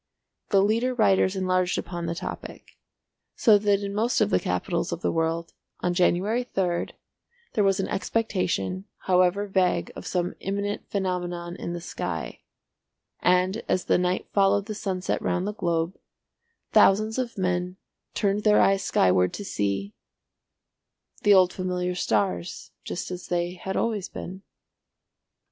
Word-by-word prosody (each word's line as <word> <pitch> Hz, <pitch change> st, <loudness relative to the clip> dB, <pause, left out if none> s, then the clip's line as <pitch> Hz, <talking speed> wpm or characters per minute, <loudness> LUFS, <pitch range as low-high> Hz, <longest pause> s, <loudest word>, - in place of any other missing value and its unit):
The 195 Hz, -2 st, +4 dB
leader 230 Hz, +5 st, +1 dB
writers 195 Hz, -4 st, +3 dB
enlarged 185 Hz, -1 st, +1 dB
upon 170 Hz, -1 st, -4 dB
the 170 Hz, -, -2 dB
topic; -, -, -7 dB, 0.6 s
so 215 Hz, -4 st, +5 dB
that 205 Hz, -1 st, +2 dB
in 200 Hz, 0 st, -3 dB
most 225 Hz, +4 st, +1 dB
of 105 Hz, -, +2 dB
the 90 Hz, -, +4 dB
capitals 90 Hz, -10 st, -2 dB
of -, -, -4 dB
the -, -, +1 dB
world, 165 Hz, +1 st, -1 dB, 0.3 s
on 180 Hz, -, +1 dB
January 190 Hz, +7 st, +2 dB
3rd, 180 Hz, -7 st, -1 dB, 0.6 s
there 210 Hz, -, +2 dB
was 195 Hz, -1 st, +2 dB
an 195 Hz, -, 0 dB
expectation, 180 Hz, -, -1 dB, 0.2 s
however 185 Hz, +2 st, +3 dB
vague 190 Hz, -2 st, +1 dB
of -, -, -8 dB
some 180 Hz, -1 st, -1 dB
imminent 200 Hz, +1 st, -3 dB
phenomenon 175 Hz, -3 st, -2 dB
in 170 Hz, -, -5 dB
the 175 Hz, -, -4 dB
sky; -, -, -5 dB, 0.8 s
and 185 Hz, +4 st, +2 dB
as 185 Hz, -, +1 dB
the -, -, +3 dB
night 180 Hz, +1 st, 0 dB
followed 200 Hz, 0 st, +3 dB
the 215 Hz, -, -4 dB
sunset 190 Hz, -3 st, -2 dB
round 180 Hz, +1 st, 0 dB
the 210 Hz, -, -2 dB
globe, 170 Hz, -2 st, -1 dB, 0.8 s
thousands 215 Hz, +4 st, +4 dB
of 245 Hz, -4 st, -3 dB
men 180 Hz, 0 st, -1 dB, 0.4 s
turned 205 Hz, 0 st, +1 dB
their 210 Hz, -1 st, +5 dB
eyes 195 Hz, 0 st, +4 dB
skyward 90 Hz, -, +3 dB
to 205 Hz, -, -6 dB
see—the 100 Hz, -, -2 dB, 1.4 s
old 185 Hz, -1 st, +5 dB
familiar 180 Hz, -1 st, -2 dB
stars 100 Hz, -, -1 dB
just 180 Hz, -, -5 dB
as 180 Hz, 0 st, -6 dB
they 175 Hz, 0 st, -1 dB
had 190 Hz, +1 st, -4 dB
always 215 Hz, -5 st, -1 dB
been. 190 Hz, +2 st, -7 dB
185 Hz, 145 wpm, -26 LUFS, 175-200 Hz, 1.4 s, so